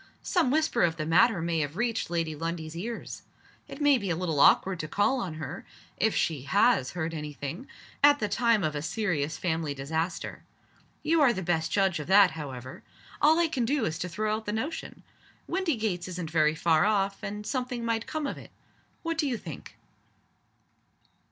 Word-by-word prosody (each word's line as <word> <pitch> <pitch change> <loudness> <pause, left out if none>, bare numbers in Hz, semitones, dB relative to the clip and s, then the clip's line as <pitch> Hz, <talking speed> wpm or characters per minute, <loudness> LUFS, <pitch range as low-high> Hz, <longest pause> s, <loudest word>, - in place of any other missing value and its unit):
"Some 350 - +2
whisper 310 -3 +1
of 165 -1 +3
the 155 - -2
matter 180 +3 +4
may 165 -1 0
have 145 +2 -3
reached 230 -3 -1
Lady 165 -2 -1
Lundie's 165 0 -4
ears. 225 +7 -6 0.5
It - - -9
may 290 -3 +4
be 200 -3 -4
a 165 - +1
little 165 -4 -1
awkward 185 +5 +5
to 155 - -3
call 255 - +1
on 180 -9 -4
her 155 +3 -6 0.3
(if 220 0 +1
she 155 -5 0
has 205 - +3
heard 165 -1 -3
any 150 -2 -5
thing) 145 - -6 0.4
at 290 0 +7
the 215 - -1
time 230 -2 +2
of 155 -2 -1
a 145 - -2
serious 160 -5 -1
family 160 -4 -2
disaster. 160 +5 -3 0.6
You 325 0 +3
are 275 -4 +6
the 190 - -4
best 160 -2 0
judge 195 -4 +2
of 150 - -6
that, 195 0 +6
however. 130 -5 -7 0.4
All 310 +2 +6
I 340 -1 +3
can 270 -6 -1
do 270 +1 +1
is 160 +2 -3
to 180 - -3
throw 215 +5 -1
out 220 0 -7
the 210 - -1
notion. 270 +9 -4 0.4
Windygates 225 - -1
isn't 180 -3 -5
very 155 -1 +3
far 160 0 +3
off 200 -2 +1
and 210 +1 -5
something 250 -2 -3
might 230 0 -1
come 310 -1 -3
of 275 - -4
it. - - -13 0.5
What 330 -1 -2
do 300 - +2
you 250 -3 -1
think?" 160 - -10
185 Hz, 190 wpm, -28 LUFS, 160-235 Hz, 0.6 s, at